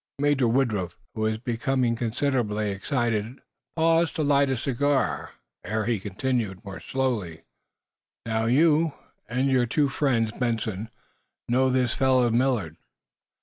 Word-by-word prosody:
Major 140 -3 +2
Woodruff, 110 -8 0 0.2
who 110 - -5
was 110 0 +1
becoming 120 +1 0
considerably 115 -3 -1
excited, 115 +2 -1 0.4
paused 165 0 +2
to 160 - 0
light 140 -1 +3
a 130 - 0
cigar, 135 +2 0 0.3
ere 110 +4 -2
he 115 -2 0
continued, 105 0 -2
more 95 -1 -7
slowly: 115 -12 -2 0.8
"Now, 110 0 0
you 155 +5 +3 0.4
and 130 +3 +1
your 125 -2 +3
two 145 +4 +1
friends, 120 -7 +1
Benson, 115 -3 -2 0.6
know 130 +2 +3
this 125 -2 +1
fellow 130 -3 +3
Millard. 115 - 0
120 Hz, 125 wpm, -26 LUFS, 110-135 Hz, 0.8 s, light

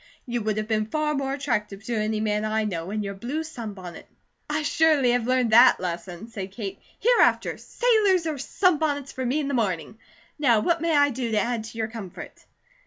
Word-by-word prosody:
You 240 -1 -2
would 215 0 -1
have 215 0 -2
been 215 -1 0
far 305 +4 0
more 275 -2 -2
attractive 215 -8 -2
to 240 - -4
any 215 0 0
man 210 -1 0
I 215 0 0
know 175 -4 -3
in 210 +1 -2
your 200 0 -4
blue 250 +11 -4
sunbonnet." 210 - -8 0.4
"I 305 +1 -1
surely 295 -4 +3
have 245 -1 0
learned 255 -3 +2
that 240 +3 +7
lesson," 180 +2 -5
said 200 -5 -7
Kate. 200 -3 -6 0.2
"Hereafter, 485 +1 +3
sailors 420 -8 +2
or 310 -3 -2
sunbonnets 300 -3 +1
for 260 - -5
me 255 +5 0
in 290 - -2
the 280 - -2
morning. 205 - -2 0.4
Now 240 -7 +4
what 340 +6 +1
may 330 -2 +2
I 285 0 +4
do 245 -1 -3
to 215 - +3
add 235 -1 -1
to 225 - -10
your 220 -1 -1
comfort?" 220 -6 -9
235 Hz, 200 wpm, -25 LUFS, 215-290 Hz, 0.4 s, that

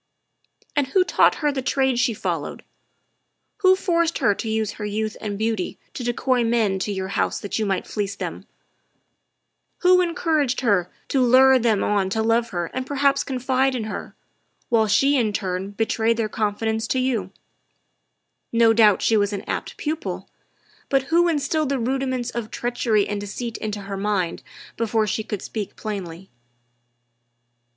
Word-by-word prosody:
"And 290 -3 +2
who 370 +7 +3
taught 365 - +3
her 295 - +4
the 275 -2 -3
trade 265 -1 +1
she 240 -2 +2
followed? - - -3 0.9
Who 375 -2 +5
forced 340 -3 +1
her 205 - +3
to 220 - -5
use 220 -1 0
her 210 - -8
youth 215 +1 -2
and 205 -2 -3
beauty 220 -3 -2 0.2
to 250 - -5
decoy 245 +1 +1
men 225 -4 +1
to 205 - -2
your 190 -1 -3
house - - 0
that 205 - -3
you 215 - 0
might 195 -2 -1
fleece 200 -1 -3
them? - - -6 1.3
Who 365 0 +6
encour 335 -3 +1
aged 255 -2 -1
her 200 -8 +2 0.2
to 270 - +2
lure 260 +1 +6
them 225 -4 +2
on 200 -2 +1
to 220 +3 0
love 230 +1 +2
her 175 -4 -3
and 260 0 -3
perhaps 280 0 +2
confide 260 0 0
in 235 - -2
her, 215 - -6 0.5
while 225 -2 +3
she 275 +7 +3
in 220 -4 +1
turn 190 -1 -2
betrayed 225 +2 0
their 225 -2 0
confidence 220 +1 -1
to 260 - 0
you? 240 -8 0 1.2
No 230 -1 +5
doubt 215 -3 +5
she 225 - +3
was 205 -1 +2
an 200 - -4
apt - - -4
pupil, 315 +3 -4 0.6
but 270 -1 +2
who 345 +1 +5
instilled 305 -1 0
the 280 - +1
rudiments 255 0 -1
of 235 -2 -4
treachery 235 -4 0
and 205 -1 -3
deceit 230 +3 -5
into 210 -1 -4
her 195 0 -5
mind 195 -4 -1 0.4
before 225 -1 +1
she 215 +1 -2
could 210 -3 -5
speak 210 -3 -5
plainly?" 190 -4 -6
225 Hz, 165 wpm, -23 LUFS, 205-265 Hz, 1.3 s, Who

